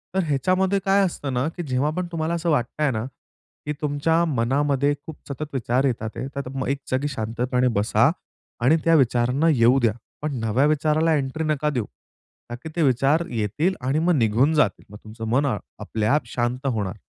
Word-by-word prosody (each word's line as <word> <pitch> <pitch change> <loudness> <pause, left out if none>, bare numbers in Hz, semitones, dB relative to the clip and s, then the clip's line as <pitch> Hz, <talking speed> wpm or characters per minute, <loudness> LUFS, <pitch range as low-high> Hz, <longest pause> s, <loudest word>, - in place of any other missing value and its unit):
तर 190 - +2
ह्याच्यामध्ये 185 +7 +1
काय 195 +1 +4
असतं 145 -6 -4
ना, 125 +3 0
की 175 +1 -6
जेव्हा 130 +3 +1
पण 180 -1 -1
तुम्हाला 165 0 -2
असं 170 0 -1
वाटतंय 150 +1 0
ना, 110 -2 -2 0.6
की 150 - -2
तुमच्या 150 +3 +1
मनामध्ये 140 +1 +1
खूप 160 - -8
सतत 145 +2 -6
विचार 130 +1 0
येत 125 -5 0
आहेत 115 +4 -5
तर 140 -2 -4
मग 130 - -2
एक 140 - 0
जागी 130 +3 0
शांतपणे 125 +1 -1
बसा 105 +1 +3 0.5
आणि 150 +7 +5
त्या 165 0 +4
विचारांना 125 +3 +2
येऊ 125 -2 +4
द्या. 115 -4 +2 0.3
पण 150 -2 -2
नव्या 115 +5 +2
विचाराला 155 +2 +2
एंट्री 140 +3 -2
नका 150 -1 0
देऊ; 125 -7 -2 0.6
ताकी 120 +7 -7
ते 170 - 0
विचार 140 +5 +2
येतील 120 - -1
आणि 135 +4 0
मग 175 +2 +2
निघून 120 +6 +3
जातील. 150 - +1
मग 105 - -10
तुमचं 110 +1 -7
मन 135 +5 +2 0.3
आपल्या-आप 110 +6 0
शांत 125 +3 -2
होणार. 105 -7 -2
135 Hz, 180 wpm, -23 LUFS, 120-155 Hz, 0.6 s, आणि